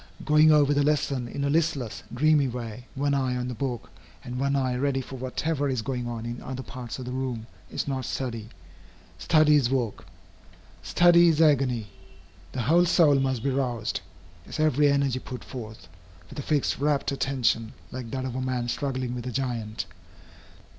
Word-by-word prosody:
Going 155 Hz, +1 st, +6 dB
over 145 Hz, -1 st, +5 dB
the 145 Hz, -, +2 dB
lesson 140 Hz, -4 st, +1 dB
in 140 Hz, +4 st, -4 dB
a 140 Hz, -, +1 dB
listless, 150 Hz, -8 st, 0 dB
dreamy 145 Hz, +2 st, +3 dB
way, 120 Hz, 0 st, -6 dB
one 140 Hz, +1 st, +1 dB
eye 130 Hz, -2 st, +1 dB
on 125 Hz, 0 st, -2 dB
the -, -, -3 dB
book 125 Hz, 0 st, -4 dB, 0.3 s
and 125 Hz, +1 st, -5 dB
one 140 Hz, +1 st, +1 dB
eye 130 Hz, -2 st, +1 dB
ready 135 Hz, +1 st, 0 dB
for 130 Hz, +1 st, -7 dB
whatever 140 Hz, +3 st, -1 dB
is 130 Hz, -4 st, -1 dB
going 125 Hz, -1 st, -3 dB
on 115 Hz, -1 st, -5 dB
in 120 Hz, +1 st, -5 dB
other 130 Hz, 0 st, -5 dB
parts 125 Hz, -4 st, -7 dB
of 130 Hz, -, -6 dB
the 125 Hz, -, -5 dB
room, 125 Hz, -3 st, -3 dB, 0.2 s
is -, -, -3 dB
not 130 Hz, -2 st, -2 dB
study. 115 Hz, -4 st, -4 dB, 0.7 s
Study 155 Hz, -2 st, +5 dB
is 125 Hz, -5 st, +2 dB
work. 125 Hz, -5 st, -2 dB, 0.7 s
Study 175 Hz, 0 st, +5 dB
is 160 Hz, -2 st, +3 dB
agony. 135 Hz, -7 st, +3 dB, 0.7 s
The 125 Hz, -, -2 dB
whole 170 Hz, +8 st, +4 dB
soul 160 Hz, -5 st, +5 dB
must 130 Hz, -3 st, 0 dB
be 140 Hz, -, +1 dB
roused, 125 Hz, -4 st, -1 dB, 0.5 s
its -, -, -6 dB
every 150 Hz, -1 st, +4 dB
energy 140 Hz, -2 st, +1 dB
put 125 Hz, -1 st, -8 dB
forth, 110 Hz, -4 st, -9 dB, 0.4 s
with -, -, -7 dB
a -, -, -1 dB
fixed, 145 Hz, -2 st, 0 dB
rapt 145 Hz, -1 st, +1 dB
attention, 125 Hz, -5 st, 0 dB, 0.2 s
like 125 Hz, -2 st, -6 dB
that 130 Hz, +2 st, -3 dB
of 130 Hz, -, -4 dB
a 130 Hz, -, -3 dB
man 125 Hz, -2 st, -1 dB
struggling 130 Hz, -2 st, -2 dB
with 125 Hz, 0 st, -5 dB
a -, -, -2 dB
giant. 115 Hz, -4 st, -3 dB
130 Hz, 180 wpm, -26 LUFS, 125-145 Hz, 0.7 s, Going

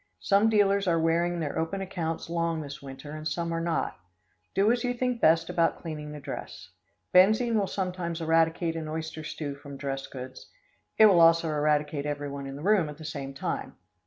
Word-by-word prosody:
Some 205 Hz, +3 st, +4 dB
dealers 200 Hz, -2 st, +3 dB
are 165 Hz, -1 st, +3 dB
wearing 170 Hz, +2 st, +1 dB
their 150 Hz, -3 st, -2 dB
open 165 Hz, +5 st, -2 dB
accounts 175 Hz, -4 st, -3 dB
long 165 Hz, -1 st, -1 dB
this 140 Hz, -1 st, -8 dB
winter 140 Hz, +1 st, -9 dB
and 155 Hz, 0 st, -5 dB
some 170 Hz, 0 st, -2 dB
are 165 Hz, -, -1 dB
not. 165 Hz, -, -1 dB, 0.6 s
Do 200 Hz, +3 st, +4 dB
as 240 Hz, -1 st, 0 dB
you 245 Hz, 0 st, 0 dB
think 250 Hz, -1 st, -1 dB
best 165 Hz, +1 st, +4 dB
about 165 Hz, -1 st, +1 dB
cleaning 150 Hz, -3 st, -6 dB
the 150 Hz, -, -7 dB
dress. -, -, -7 dB, 0.4 s
Benzine 215 Hz, +6 st, +5 dB
will 205 Hz, -3 st, +2 dB
sometimes 180 Hz, -3 st, -3 dB
eradicate 165 Hz, +1 st, +2 dB
an 160 Hz, -1 st, -4 dB
oyster 160 Hz, 0 st, -5 dB
stew 150 Hz, -2 st, -5 dB
from 140 Hz, 0 st, -10 dB
dress 135 Hz, 0 st, -4 dB
goods. 130 Hz, -1 st, -9 dB, 0.5 s
It 220 Hz, -, +8 dB
will 195 Hz, -5 st, +6 dB
also 165 Hz, 0 st, +5 dB
eradicate 150 Hz, -1 st, 0 dB
everyone 145 Hz, -1 st, -4 dB
in 135 Hz, -, -6 dB
the 145 Hz, -, -8 dB
room 195 Hz, -5 st, +3 dB
at 150 Hz, -, -9 dB
the 160 Hz, -, -10 dB
same 140 Hz, -2 st, -5 dB
time. -, -, -4 dB
165 Hz, 190 wpm, -28 LUFS, 150-180 Hz, 0.6 s, It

